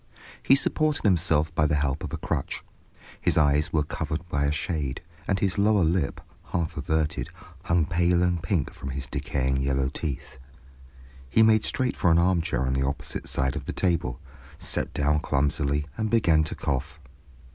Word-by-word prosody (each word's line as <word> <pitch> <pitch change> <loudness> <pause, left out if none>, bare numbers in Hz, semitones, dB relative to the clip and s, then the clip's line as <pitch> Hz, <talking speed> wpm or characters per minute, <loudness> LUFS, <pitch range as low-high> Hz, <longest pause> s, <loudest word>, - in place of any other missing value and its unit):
He 135 - +5
supported 155 +2 +1
himself 80 -4 +2
by 75 -2 +2
the 75 - +1
help 70 0 -1
of - - -5
a - - -3
crutch, - - -3 0.6
his - - +2
eyes 75 0 +3
were 75 -2 +2
covered 75 +3 -4
by 70 -1 0
a 70 - +2
shade, 75 -3 -2 0.3
and 100 - +2
his 95 0 0
lower 105 -2 +4
lip, 80 -3 0 0.3
half 85 -3 -2
averted, 80 -1 -1 0.4
hung 85 -1 +2
pale 85 +1 +2
and 90 -2 +1
pink 85 -4 -1
from 70 - -7
his 65 0 -4
decaying 65 +1 -1
yellow 65 0 0
teeth. 70 -3 -5 0.9
He 110 - +5
made 110 -1 +5
straight 130 -1 -1
for 90 - +2
an 80 - +5
armchair 85 -7 +2
on 65 0 0
the 65 - 0
opposite 70 +1 -4
side 65 -1 0
of - - -5
the - - -4
table, 85 -9 0 0.4
sat - - 0
down 75 +1 +1
clumsily, 70 0 0
and 110 0 0
began 85 -9 +4
to - - -4
cough. 80 +5 -3
80 Hz, 175 wpm, -26 LUFS, 70-90 Hz, 0.9 s, He